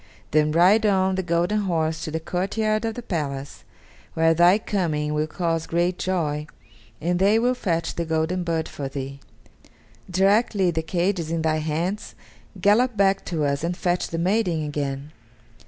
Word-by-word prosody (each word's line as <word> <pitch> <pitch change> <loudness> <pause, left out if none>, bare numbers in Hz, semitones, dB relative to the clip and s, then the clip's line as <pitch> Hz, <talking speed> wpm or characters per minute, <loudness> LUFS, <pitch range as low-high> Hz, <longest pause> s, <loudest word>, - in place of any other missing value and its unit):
Then 150 0 +3
ride 185 +7 +5
on 190 -2 +2
the 190 - 0
golden 175 +4 +1
horse 160 -5 -1
to - - -3
the 160 +1 -2
courtyard 215 +6 -1
of 225 -1 -2
the 245 - -6
palace, 140 -8 -4 0.5
where 165 0 +4
thy 175 +4 +5
coming 160 -8 -1
will 150 +1 0
cause 165 0 -2
great 175 +2 0
joy, 155 -5 -1 0.5
and 175 +2 0
they 200 +3 +4
will 245 +2 +2
fetch 170 -9 -1
the 170 - -2
golden 160 +3 -1
bird 165 -2 -1
for 140 - -5
thee. 135 0 -6 0.9
Directly 195 0 +2
the 160 - -1
cage 180 +3 0
is 160 -2 -4
in 165 -1 -1
thy 155 -1 +1
hands, 165 +7 -3 0.4
gallop 220 +3 +3
back 195 0 +3
to 160 -4 -1
us 140 +1 -1
and 175 +1 -2
fetch 175 0 0
the 165 - -4
maiden 175 -3 +1
again." 145 -1 -4
170 Hz, 170 wpm, -24 LUFS, 155-195 Hz, 0.9 s, ride